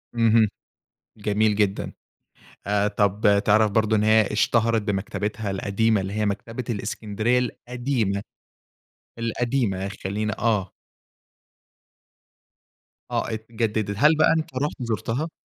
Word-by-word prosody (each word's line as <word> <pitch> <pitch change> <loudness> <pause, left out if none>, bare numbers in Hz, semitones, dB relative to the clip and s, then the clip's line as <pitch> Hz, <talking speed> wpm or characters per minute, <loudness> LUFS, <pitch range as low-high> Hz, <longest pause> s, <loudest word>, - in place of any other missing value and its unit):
اهم، 115 -1 +4 0.7
جميل 105 +1 +1
جدًا. 100 -2 0 0.8
آآ 105 0 +2
طب 100 0 +2
تعرف 110 0 +4
برضه 110 0 +2
إن 105 - +2
هي 110 0 +5
اشتهرت 115 +1 +2
بمكتبتها 105 +1 -3
القديمة 100 +2 +1
اللي 95 +1 -5
هي 105 0 0
مكتبة 115 +4 -3
الإسكندرية 110 +2 -1
القديمة؟ 120 -4 -2 1.0
القديمة 115 -4 -1 0.2
خلِّين 105 +3 -1
آه. 105 -5 +1 2.4
آه - - 0
اتجددت. 110 -2 -2
هل 150 +5 +5
بقى 155 - +5
أنت 155 -4 -4
رُحت 145 +3 -1
زُرتها؟ 115 - -2
110 Hz, 105 wpm, -24 LUFS, 100-115 Hz, 2.4 s, هي